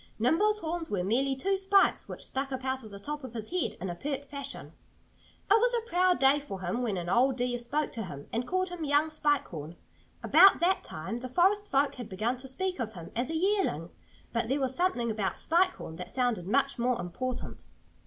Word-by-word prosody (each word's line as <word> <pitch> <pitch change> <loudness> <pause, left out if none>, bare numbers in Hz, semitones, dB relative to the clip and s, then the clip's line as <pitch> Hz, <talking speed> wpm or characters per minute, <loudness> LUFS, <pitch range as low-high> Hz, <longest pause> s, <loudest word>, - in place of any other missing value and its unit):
Nimble's 405 - +2
horns 330 0 -3
were 195 -3 -1
merely 265 +7 +1
two 390 +9 0
spikes 390 +1 +3
which - - -7
stuck 270 +1 -3
up 260 0 -4
out 260 -1 -1
of 215 - -10
the 200 -1 -9
top 295 +6 -5
of 245 -2 -8
his 220 +3 -4
head 365 -1 -1
in 185 - -4
a 175 - -3
pert 280 +9 -4
fashion. 280 0 -7 0.7
It 400 - +5
was 480 +3 +4
a 465 -1 -2
proud 360 -1 +3
day 270 +2 +5
for 195 -10 -7
him 185 +7 -2
when 220 -6 -1
an 175 -1 -4
old 250 +7 +3
deer 245 -1 -1
spoke 290 +6 -1
to 225 -4 -4
him 145 -5 -9
and 235 +2 -1
called 370 0 0
him 350 -2 -6
"young 295 +2 +2
Spike 295 -2 +1
Horn." 160 0 -7 0.5
About 380 +5 +7
that 365 +2 +2
time 160 +9 -5
the 255 +1 -6
forest 390 +8 +3
folk 275 -2 +2
had 245 -4 -8
begun 215 +6 -1
to 265 +2 -9
speak 365 +7 -2
of 225 -3 -3
him 170 -3 -9
as 240 +2 -1
a 325 - -2
"yearling." 345 - +1 0.4
But 230 -1 0
there 270 +4 0
was 265 -1 0
something 245 -11 +1
about 210 -3 -2
"Spike 360 +3 +2
Horn" 160 - -8
that 180 0 -7
sounded 240 -8 0
much 275 +4 +1
more 245 0 +1
important. 245 +9 -5
265 Hz, 225 wpm, -29 LUFS, 225-335 Hz, 0.7 s, About